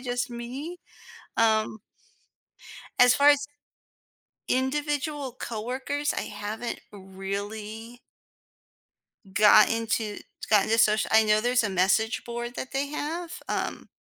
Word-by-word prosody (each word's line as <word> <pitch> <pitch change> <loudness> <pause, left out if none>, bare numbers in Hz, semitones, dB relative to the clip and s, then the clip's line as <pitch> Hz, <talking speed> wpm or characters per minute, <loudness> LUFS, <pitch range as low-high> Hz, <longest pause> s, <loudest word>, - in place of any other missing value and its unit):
just 245 0 -2
me. 260 +9 -6 0.6
Um 220 -1 +2 1.2
as 250 0 +7
far 285 +1 +5
as 285 0 +2 1.0
individual 290 +1 -1
coworkers, 260 +6 -3
I - - -2
haven't 210 +3 -5
really 205 +4 -6 1.3
gotten 215 +2 +5
to 220 -2 -1 0.3
gotten 210 -2 +4
to 225 - +4
social 215 -1 +3
I 220 - +7
know 215 0 +3
there's 245 +1 +2
a 205 - -1
message 195 +5 +1
board 240 0 -5
that 260 - -6
they 275 +1 -1
have, 330 +4 -4
um - - -3
235 Hz, 110 wpm, -26 LUFS, 215-270 Hz, 1.3 s, as